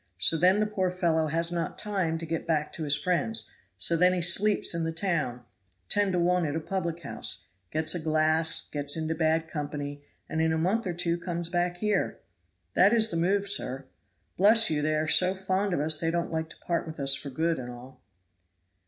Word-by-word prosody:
So 90 - +3
then 180 +5 +4
the 215 - +2
poor 195 -3 -1
fellow 170 -3 0
has 165 +2 0
not 170 -2 -3
time 190 -6 -1
to 165 - -5
get 165 0 -4
back 155 -2 0
to 160 - -3
his 145 0 +3
friends, 180 +8 0 0.3
so 170 - +2
then 180 +2 +4
he 185 - -1
sleeps 195 +5 +3
in 170 0 -2
the 165 - -1
town, 160 -9 -2 0.5
ten 205 -1 +1
to 180 - 0
one 180 +1 +2
at 145 - -3
a - - 0
public 170 -1 -4
house; 140 - -3 0.2
gets 155 0 0
a 175 - -2
glass, 155 +1 +1
gets 145 +1 0
into 160 0 -1
bad 160 0 +1
company, 145 -2 -5 0.3
and 160 - -2
in 160 0 +2
a 160 - 0
month 190 +7 0
or 180 - -2
two 170 0 -1
comes 170 -1 -4
back 175 0 -1
here. 210 0 -1 0.6
That 205 - +5
is 225 -1 +4
the 165 - -1
move, 195 +4 +1
sir. 135 -8 -1 0.5
Bless 215 +1 +5
you, 150 -1 0
they 155 +1 0
are 155 +1 -1
so 185 +4 +4
fond 190 +1 -1
of 175 - 0
us 155 +1 +2
they 165 - 0
don't 170 +1 -2
like 160 0 -2
to - - -13
part 170 -1 -2
with 160 -1 -8
us 135 -1 +4
for 140 - -3
good 160 +4 -1
and 125 -1 -6
all." 125 +1 -12
165 Hz, 215 wpm, -27 LUFS, 155-180 Hz, 0.6 s, That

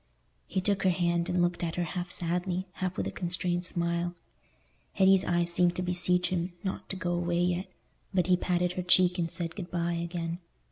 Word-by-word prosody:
He 190 - -1
took 195 +1 +1
her 190 - +4
hand, 170 0 +1
and 180 -1 +2
looked 175 0 0
at 165 -1 -2
her 175 - 0
half 175 +2 -4
sadly, 180 +1 -1
half 185 0 -3
with - - -1
a - - -2
constrained 175 0 -1
smile. 170 0 -1 0.8
Hetty's 190 0 +6
eyes 175 0 +1
seemed 175 0 +3
to 180 - -1
beseech 180 0 +1
him 180 0 -2
not 190 - -4
to - - -2
go 180 -2 -2
away 175 0 0
yet; 180 +1 -1 0.4
but 185 -3 +2
he 180 0 +4
patted 180 0 0
her 180 - -3
cheek 180 0 +4
and 165 -1 0
said 165 0 -3
"Good 185 -3 -6
bye" 170 0 -1
again. 170 0 -3
175 Hz, 200 wpm, -29 LUFS, 175-180 Hz, 0.8 s, Hetty's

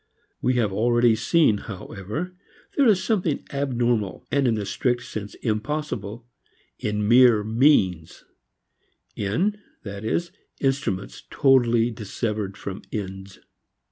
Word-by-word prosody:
We 125 - +1
have 110 -5 +1
already 120 +2 +3
seen, 110 - +3
however, 105 - -6 0.4
there 280 -3 +4
is 205 -4 +4
something 180 -9 0
abnormal 120 -7 -1
and 140 -2 +2
in 115 - +2
the 105 -2 -3
strict 120 +5 -1
sense 105 -3 -7
impossible 115 -1 -3 0.5
in 105 -1 -1
mere 120 -2 +6
means, 110 - +2 0.9
in, 180 - 0 0.2
that 100 -2 -7
is, 170 +10 -1 0.3
instruments 135 -9 -1
totally 120 -4 +3
dissevered 105 -2 -4
from 100 0 -6
ends. 95 -2 -6
115 Hz, 110 wpm, -24 LUFS, 105-135 Hz, 0.9 s, mere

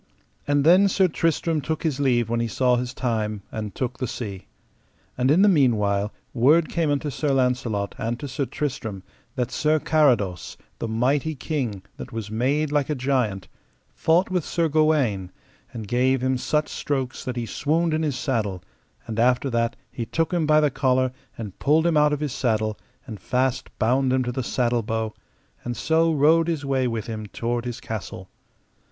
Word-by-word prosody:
And 145 -1 +2
then 180 +6 +6
Sir 190 -1 +3
Tristram 165 -1 0
took 160 +2 -3
his 150 -4 -1
leave 120 -5 +2
when 115 +1 -1
he 115 - 0
saw 125 +2 +2
his 125 0 -2
time, 110 -6 -2
and 105 -2 -5
took 130 0 -3
the 130 - -1
sea. 100 -6 -6 0.7
And 125 +1 +1
in 170 +7 +5
the - - +6
meanwhile 105 - +2 0.2
word 150 +7 +4
came 165 -3 0
unto 145 0 -1
Sir 150 +3 -2
Launcelot 125 -6 0
and 115 +2 -2
to 145 - -5
Sir 135 +1 -2
Tristram 110 -9 -4 0.3
that 125 -1 -2
Sir 155 0 +2
Carados, 125 - +1 0.2
the - - -2
mighty 135 +7 0
king, 125 - -3
that - - -8
was 110 -2 -5
made 140 +7 0
like 145 -1 +1
a 150 - 0
giant, 125 -8 -1 0.5
fought 170 - +2
with 180 -3 0
Sir 170 +1 0
Gawaine, 145 - +1 0.4
and 110 -3 -7
gave 130 +3 +2
him 130 0 +2
such 150 +4 0
strokes 135 -3 -3
that 125 - -4
he 120 -1 -2
swooned 160 +7 0
in 155 - +1
his 150 -4 -1
saddle, 105 - -2 0.4
and 115 -1 -4
after 125 +3 +2
that 115 0 0 0.2
he 115 -2 -5
took 165 +2 -1
him 165 -3 +1
by 155 0 +5
the 150 -2 +2
collar 130 0 +1 0.3
and 105 -5 -7
pulled 155 +3 +3
him 170 -2 +2
out 150 0 +4
of 150 0 -1
his 145 -4 -2
saddle, 110 -4 0 0.3
and 110 -6 -8
fast 130 +5 -1
bound 130 +3 +2
him 130 0 +2
to 125 - -2
the 130 - -2
saddle 120 -1 0
bow, 110 0 -2 0.5
and 120 -1 -4
so 165 +1 +2
rode 160 +2 +4
his 160 -4 -2
way 135 -2 +1
with 115 -3 -3
him 110 -2 -5
toward 120 +3 -3
his 120 0 -4
castle. 105 -5 -6
130 Hz, 185 wpm, -24 LUFS, 115-150 Hz, 0.7 s, then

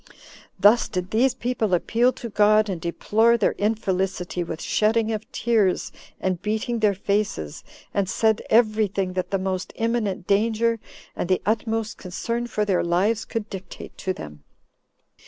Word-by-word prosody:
Thus 210 +5 +5
did 180 -1 -3
these 245 +4 +3
people 230 -6 0
appeal 235 +8 +2
to 235 - -7
God, 215 0 +4
and 180 -4 -3
deplore 220 +7 +2
their 225 - +2
infelicity 190 -4 -1
with 160 -1 -6
shedding 220 +1 +1
of 215 0 -5
tears, 220 -6 +1 0.3
and 185 -2 -1
beating 220 +3 -1
their 210 -2 +3
faces, 200 - -2 0.3
and 195 -2 0
said 220 +2 +2
every 220 -2 +4
thing 190 -1 -2
that 185 0 -2
the 195 - +1
most 185 -1 -3
imminent 225 -5 -1
danger 225 +3 +2 0.4
and 175 - -3
the 185 - +3
utmost 225 +1 -1
concern 230 +6 -3
for 210 -2 -1
their 190 -3 +1
lives 190 +6 +1
could 225 -2 -4
dictate 190 -2 -9
to 190 - -1
them. 75 - -8
210 Hz, 155 wpm, -24 LUFS, 185-225 Hz, 0.4 s, Thus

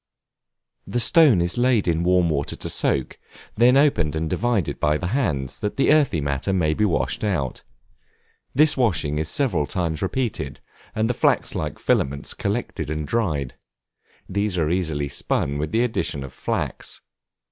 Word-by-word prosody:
The 120 - -1
stone 140 - +5
is 85 +7 -2
laid 120 -5 +2
in 85 -1 +1
warm 90 0 +3
water 70 -1 -2
to - - -4
soak, 65 - 0 0.4
then 125 +4 +5
opened 85 - +2
and 80 +1 -1
divided 115 -1 -1
by 75 0 +2
the 90 - -5
hands, 70 - -1
that 105 - -3
the 140 - +4
earthy 145 - +3
matter 70 +5 -1
may 85 -5 +1
be 105 - +1
washed 95 +2 -1
out. 80 - -1 0.9
This 150 +2 +5
washing 85 - 0
is 80 +1 -2
several 105 - 0
times 80 +1 -2
repeated, 110 +4 -2 0.4
and 110 +1 +1
the 125 - 0
flax - - +1
like - - -3
filaments 70 +1 0
collected - - -3
and 75 -1 -3
dried; 80 - -1 0.7
these 100 -1 -1
are 80 -2 +1
easily 80 -5 -1
spun 70 +1 -1
with 75 +1 -3
the 115 +2 +2
addition 95 - -2
of 65 - -9
flax. - - -4
90 Hz, 160 wpm, -23 LUFS, 75-115 Hz, 0.9 s, stone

